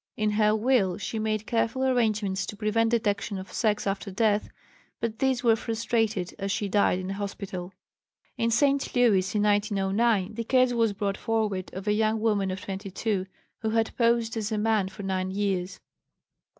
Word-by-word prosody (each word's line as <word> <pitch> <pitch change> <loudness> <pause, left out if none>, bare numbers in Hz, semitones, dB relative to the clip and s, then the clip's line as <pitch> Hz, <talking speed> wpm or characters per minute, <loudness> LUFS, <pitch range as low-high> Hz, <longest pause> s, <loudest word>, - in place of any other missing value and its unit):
In 215 -1 +1
her 210 0 +3
will 220 -5 +2
she 225 - -4
made 215 -1 -1
careful 235 +3 0
arrangements 215 -6 +1
to 210 - -7
prevent 220 +2 +1
detection 205 -3 0
of 190 0 -8
sex 210 -2 0
after 195 +1 -2
death, 210 +1 +1 0.5
but 225 -1 -3
these 260 -2 +1
were 230 -2 +5
frustrated, 225 -4 -1
as 195 0 -2
she 205 - -1
died 200 -2 +2
in 185 +1 -4
a - - -2
hospital. 195 -2 -5 0.6
In 230 - 0
St. 275 +4 +2
Louis, 205 -6 +3
in 210 - +2
1909, 205 0 +1
the 230 +1 -3
case 255 +1 +3
was 230 -3 +2
brought 200 -1 -2
forward 215 -5 -1
of 190 +2 -6
a 210 - +3
young 220 +1 +1
woman 210 -3 +1
of 185 0 -4
22, 195 0 -3 0.3
who 220 - -1
had 225 0 0
posed 230 -1 +2
as 220 -1 -2
a 215 - 0
man 215 -2 +1
for 195 +1 -9
nine 190 -1 -1
years. 195 -2 -2
215 Hz, 175 wpm, -27 LUFS, 195-225 Hz, 0.6 s, were